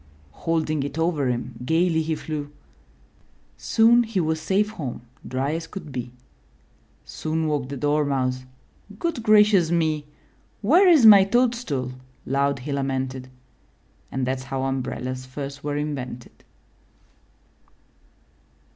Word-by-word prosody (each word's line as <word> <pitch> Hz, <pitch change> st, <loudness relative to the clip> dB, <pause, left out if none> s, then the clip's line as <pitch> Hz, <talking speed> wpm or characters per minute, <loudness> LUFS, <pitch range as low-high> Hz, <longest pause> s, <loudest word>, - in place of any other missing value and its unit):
Holding 155 Hz, -, -1 dB
it 140 Hz, +2 st, -5 dB
over 160 Hz, -4 st, 0 dB
him, 120 Hz, 0 st, -3 dB
gayly 160 Hz, +3 st, +2 dB
he 160 Hz, 0 st, -1 dB
flew. 150 Hz, -2 st, -5 dB, 1.1 s
Soon 235 Hz, +1 st, +4 dB
he 225 Hz, -4 st, -2 dB
was 160 Hz, -1 st, -1 dB
safe 200 Hz, +5 st, +1 dB
home, 140 Hz, -, -6 dB, 0.2 s
dry 135 Hz, +3 st, -1 dB
as 165 Hz, 0 st, -4 dB
could 190 Hz, -7 st, -9 dB
be. 125 Hz, -2 st, -5 dB, 0.9 s
Soon 160 Hz, 0 st, -3 dB
woke 145 Hz, -4 st, -1 dB
the 140 Hz, -, -5 dB
Dormouse 135 Hz, -3 st, 0 dB, 0.2 s
— 205 Hz, -, -20 dB
''Good 335 Hz, -2 st, -2 dB
gracious 210 Hz, -5 st, +5 dB
me!" 155 Hz, -3 st, 0 dB, 0.6 s
''Where 345 Hz, -, +5 dB
is 305 Hz, -9 st, +6 dB
my 205 Hz, -3 st, +10 dB
toadstool?" 220 Hz, -, 0 dB, 0.3 s
loud 140 Hz, +1 st, +1 dB
he 145 Hz, -, -3 dB
lamented. 130 Hz, -1 st, -3 dB, 0.8 s
And 130 Hz, -1 st, -1 dB
that*s 130 Hz, 0 st, -3 dB
how 135 Hz, 0 st, -3 dB
umbrellas 130 Hz, -1 st, -3 dB
first 140 Hz, +1 st, -7 dB
were 145 Hz, 0 st, -2 dB
invented. 135 Hz, -5 st, -5 dB
150 Hz, 120 wpm, -24 LUFS, 135-180 Hz, 1.1 s, my